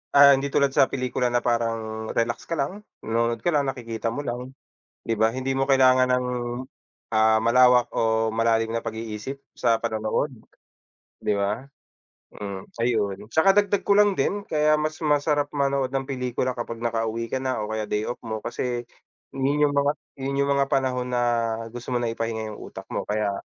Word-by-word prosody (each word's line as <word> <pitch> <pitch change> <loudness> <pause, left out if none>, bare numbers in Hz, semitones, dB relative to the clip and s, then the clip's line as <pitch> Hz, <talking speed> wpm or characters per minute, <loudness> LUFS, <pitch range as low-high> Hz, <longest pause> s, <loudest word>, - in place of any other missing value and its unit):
ah, 140 0 +9
hindi 140 +1 -3
tulad 140 -1 +3
sa 135 - +5
pelikula 125 -1 -1
na 120 - +3
parang 115 -2 -1
relax 115 0 -1
ka 170 - -1
lang, 185 +10 -3 0.2
nanonood 115 0 0
ka - - +2
lang 145 -1 +2
nakikita 115 -3 -4
mo 145 - -3
lang, 125 +2 -4 0.6
di 115 - +1
ba? 110 +1 +4
Hindi 130 +1 -2
mo 135 - +2
kailangan 130 -1 +5
ng, 125 0 +1 0.9
ah, 110 0 +5
malawak 125 +1 +5
o 110 0 +2
malalim 115 0 +2
na 115 - -1
pag-iisip 110 +4 -5 0.2
sa 115 -2 +2
panonood, 110 +5 -1 0.9
di 105 - +2
ba? 100 +5 -1 0.7
Hmm 100 -2 -6 0.2
ayun, 105 -3 -1
tsaka 195 +5 +5
dagdag 205 -1 +2
ko 200 - +4
lang 205 0 +6
din 205 0 0
kaya 155 -3 +2
mas 155 +1 -2
masarap 145 -1 +1
manood 140 -2 0
ng 135 0 0
pelikula 125 -1 -1
kapag 115 -1 -5
nakauwi 115 0 -1
ka 130 - 0
na 130 -4 -2
o 105 - -5
kaya 110 -1 -2
day 105 +1 -1
off 120 - -4
mo 110 -1 -4
kasi 120 0 -3 0.5
yun 140 +2 +1
yung - - -3
mga 140 0 +3 0.3
yun 140 +1 -2
yung 140 - 0
mga 140 -1 +2
panahon 130 -2 0
na 120 - +2 0.5
gusto 120 +1 -6
mo - - +4
na 115 -1 0
ipahinga 115 -1 -3
yung 105 - -9
utak - - -9
mo - - -2
kaya. 105 -1 -1
120 Hz, 180 wpm, -25 LUFS, 115-135 Hz, 0.9 s, ah